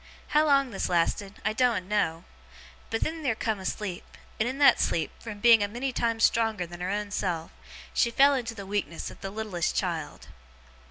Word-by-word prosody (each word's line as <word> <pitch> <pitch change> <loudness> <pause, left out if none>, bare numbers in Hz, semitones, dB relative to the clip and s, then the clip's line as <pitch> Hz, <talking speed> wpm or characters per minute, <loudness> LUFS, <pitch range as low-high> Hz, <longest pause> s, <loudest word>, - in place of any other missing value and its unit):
How 305 +1 +3
long 275 -3 +3
this 195 - -2
lasted, 185 +3 0
I 215 - +1
doen't 220 -6 +1
know; 170 -6 0 0.7
but 225 - -2
then 320 +1 -2
theer 260 -7 0
come 220 -2 -2
a 190 - -9
sleep; 190 -4 -4 0.4
and 220 +3 +1
in 260 - -5
that 285 - +6
sleep, 165 - 0
from 215 -3 -7
being 230 0 +7
a 205 - +1
many 245 +5 -3
times 230 -1 0
stronger 225 -5 +2
than 175 +1 -10
her 180 - -2
own 205 +1 -2
self, 170 -5 -2 0.4
she 235 - +3
fell 275 +4 +5
into 245 -4 -2
the 200 -2 -7
weakness 195 -4 -3
of - - -15
the 195 - -4
littlest 200 -4 -2
child. 165 -5 -3
210 Hz, 200 wpm, -27 LUFS, 185-235 Hz, 0.7 s, being